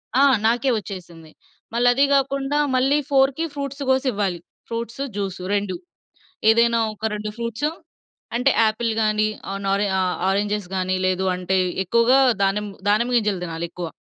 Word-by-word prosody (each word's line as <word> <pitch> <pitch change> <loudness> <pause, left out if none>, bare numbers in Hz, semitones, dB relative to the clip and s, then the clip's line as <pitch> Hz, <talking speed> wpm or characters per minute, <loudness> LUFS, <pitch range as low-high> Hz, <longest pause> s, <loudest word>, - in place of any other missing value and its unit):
ఆ! 270 - +5 0.2
నాకే 240 +4 +2
ఒచ్చేసింది. 175 -5 -10 0.4
మళ్ళదీ 245 +3 +4
గాకుండా, 275 +1 +1 0.2
మళ్ళీ 270 +3 +3
4కి 270 +3 +3
ఫ్రూట్స్ 280 0 -5
గోసివ్వాలి. 210 -9 0 0.3
Fruits, 235 +3 -4
juice 195 -3 -4
2. 205 -2 -1 0.7
ఏదైనా 230 +1 +4
ఒక 215 +1 -6
2 210 0 -4
ఫ్రూట్సు. 235 +5 -2 0.7
అంటే, 250 +3 +3
యాపిల్ 220 +1 0
గానీ, 215 0 +2 0.2
ఆహ్, 195 - -4
నొ 195 - +1
రె 205 - +1
ఆ - - +2 0.3
ఆరెంజెస్ 205 0 -1
గానీ, 185 0 0
లేదు 185 0 0
అంటే, 185 +1 -1 0.3
ఎక్కువగా 235 +7 +4 0.2
దానిమ్మ 205 +1 0 0.2
దానిమ్మ 235 +4 +2
గింజలు 210 -5 0
తినాలెక్కువ. 170 +1 -5
220 Hz, 135 wpm, -22 LUFS, 195-255 Hz, 0.7 s, ఆ